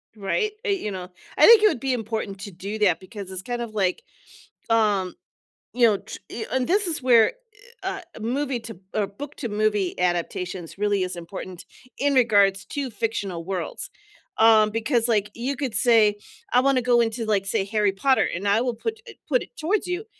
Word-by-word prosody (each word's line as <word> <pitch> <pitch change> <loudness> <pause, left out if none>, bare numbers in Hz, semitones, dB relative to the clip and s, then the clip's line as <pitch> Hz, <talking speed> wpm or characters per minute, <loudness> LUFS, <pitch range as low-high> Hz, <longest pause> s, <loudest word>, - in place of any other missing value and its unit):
Right, 220 - -1
uh, - - 0
you 375 - -1
know, 180 -2 -6 0.3
I - - +7
think 460 -2 +9
it 430 - +7
would 330 - 0
be 265 +1 -1
important 220 -4 -4
to 200 - -7
do 200 +4 -6
that 190 -6 +3
because 195 0 -9
it's 185 0 -6
kind 240 +2 -3
of 225 -2 -6
like, 190 -3 0 0.7
um, 205 -5 +2 0.6
you 245 -1 +5
know, 210 -3 +3
t 225 +3 -8
and 255 +1 0
this 400 +3 +2
is 325 -5 -2
where, 240 -3 +5 0.5
eh, 380 - -2
uh, - - -8 0.2
a - - -10
movie 260 +3 -1
to 225 -5 -9 0.2
or 210 -2 +1
book 280 +9 -9
to 240 - -4
movie 210 -3 0
adaptations 180 0 -2
really 205 -1 +1
is 185 -1 -3
important 175 +1 -8 0.3
in 285 +1 +1
regards 200 -6 +4
to 280 -2 -3
fictional 205 -7 -3
worlds, 195 - -4 0.5
um, 220 -1 +6
because 230 +2 +1
like 210 -3 +1
you 250 +4 -2
could 270 -4 -3
say, 220 -4 +4 0.4
"I 250 - +5
wanna 265 0 +3
go 240 0 +4
into 225 0 -2
like, 205 -3 +1
say 195 - 0
Harry 210 -1 +1
Potter," 260 +7 +2
and 195 +4 -2
I 210 +3 +3
will 250 -1 -1
put 445 - -4
it - - -12
put - - +2
it - - -12
towards 375 +7 0
you 360 +3 -3
220 Hz, 200 wpm, -24 LUFS, 195-255 Hz, 0.7 s, think